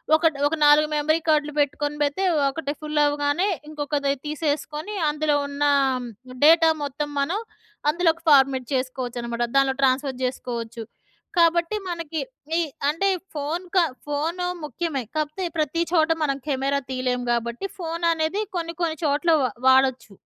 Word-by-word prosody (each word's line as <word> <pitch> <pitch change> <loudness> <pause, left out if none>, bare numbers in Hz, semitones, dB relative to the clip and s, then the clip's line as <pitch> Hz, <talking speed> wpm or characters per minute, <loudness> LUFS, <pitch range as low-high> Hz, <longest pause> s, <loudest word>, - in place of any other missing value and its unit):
ఒకటి 320 -2 +2
ఒక 310 - -1
4 295 +1 +6
మెమరీ 310 +2 +1
కార్డ్‌లు 300 -1 +2
పెట్టుకొని 290 +1 0
పెడితే 290 +6 -1 0.3
ఒకటి 285 +1 -4
ఫుల్ 300 -1 0
అవ్వగానే 290 +6 +1 0.2
ఇంకొకది 290 -2 -1
తీసేసుకుని 305 +4 -3
అందులో 300 0 +1
ఉన్న 285 +1 -3 0.8
డేటా 325 +1 +7
మొత్తం 290 +1 -3
మనం 335 +9 0 0.5
అందులోకి 335 0 +1
ఫార్మాట్ 265 -3 +4
చేసుకోవచ్చనమాట. 245 -2 -3
దాంట్లో 270 -1 +3
ట్రాన్స్ఫర్ 265 0 +1
జేసుకోవచ్చు. 235 -2 -4 0.5
కాబట్టి 340 +3 +3
మనకి 330 -2 -4 0.4
ఈ - - +3 0.3
అంటే 330 +7 +1 0.2
ఫోన్ 310 +4 -3
క - - +4 0.3
ఫోను 325 +5 -1 0.2
ముఖ్యమే. 295 -1 -3
కాకపోతే 305 +4 -2
ప్రతి 310 +2 0
చోట 325 -2 +3
మనం 275 -2 0
కెమెరా 275 0 0
తీయలేము. 255 -1 -1
గాబట్టి 235 +8 -2
ఫోన్ 335 0 -3
అనేది 320 +6 -1 0.2
కొన్ని 335 0 -4
కొన్ని 320 -1 -1
చోట్ల 300 +4 +2
వా 255 - +1 0.2
వాడొచ్చు. 260 -3 +3
295 Hz, 135 wpm, -24 LUFS, 270-325 Hz, 0.8 s, డేటా